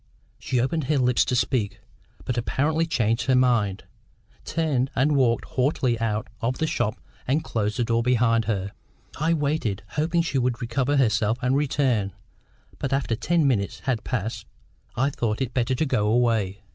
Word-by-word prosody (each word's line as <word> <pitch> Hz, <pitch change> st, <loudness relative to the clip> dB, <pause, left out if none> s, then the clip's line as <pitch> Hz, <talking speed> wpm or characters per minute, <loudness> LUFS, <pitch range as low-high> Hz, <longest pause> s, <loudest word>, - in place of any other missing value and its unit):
She 125 Hz, -, -1 dB
opened 140 Hz, +4 st, 0 dB
her 150 Hz, +2 st, +1 dB
lips 125 Hz, -2 st, +3 dB
to 125 Hz, -, 0 dB
speak, 120 Hz, -3 st, 0 dB, 0.5 s
but 125 Hz, -, -2 dB
apparently 150 Hz, +7 st, 0 dB
changing 115 Hz, -5 st, 0 dB
her 130 Hz, -, +4 dB
mind, 115 Hz, -6 st, +2 dB, 0.6 s
turned 145 Hz, -6 st, 0 dB
and 145 Hz, +4 st, +2 dB
walked 120 Hz, -4 st, +2 dB
haughtily 130 Hz, -3 st, 0 dB
out 110 Hz, -2 st, -1 dB
of 125 Hz, +3 st, -1 dB
the 160 Hz, -, 0 dB
shop 110 Hz, -8 st, -1 dB, 0.3 s
and 145 Hz, +5 st, +1 dB
closed 105 Hz, 0 st, -2 dB
the 120 Hz, -, +1 dB
door 115 Hz, 0 st, +1 dB
behind 115 Hz, -2 st, +2 dB
her. 100 Hz, -2 st, -2 dB, 0.5 s
I 165 Hz, +2 st, +2 dB
waited, 145 Hz, -10 st, -1 dB
hoping 165 Hz, +3 st, 0 dB
she 145 Hz, -5 st, -1 dB
would 120 Hz, -1 st, 0 dB
recover 130 Hz, +4 st, 0 dB
herself 115 Hz, -3 st, +2 dB
and 125 Hz, +1 st, +2 dB
return; 130 Hz, -8 st, +1 dB, 0.7 s
but, 135 Hz, -, -2 dB
after 135 Hz, -4 st, 0 dB
ten 160 Hz, +5 st, +1 dB
minutes 105 Hz, -7 st, 0 dB
had 125 Hz, -5 st, -1 dB
passed, 110 Hz, -3 st, -3 dB, 0.5 s
I 135 Hz, +4 st, +1 dB
thought 110 Hz, -5 st, -2 dB
it 130 Hz, -2 st, -2 dB
better 130 Hz, 0 st, +1 dB
to 155 Hz, -, 0 dB
go 105 Hz, -7 st, +1 dB
away. 110 Hz, -4 st, +1 dB
125 Hz, 170 wpm, -25 LUFS, 115-140 Hz, 0.7 s, her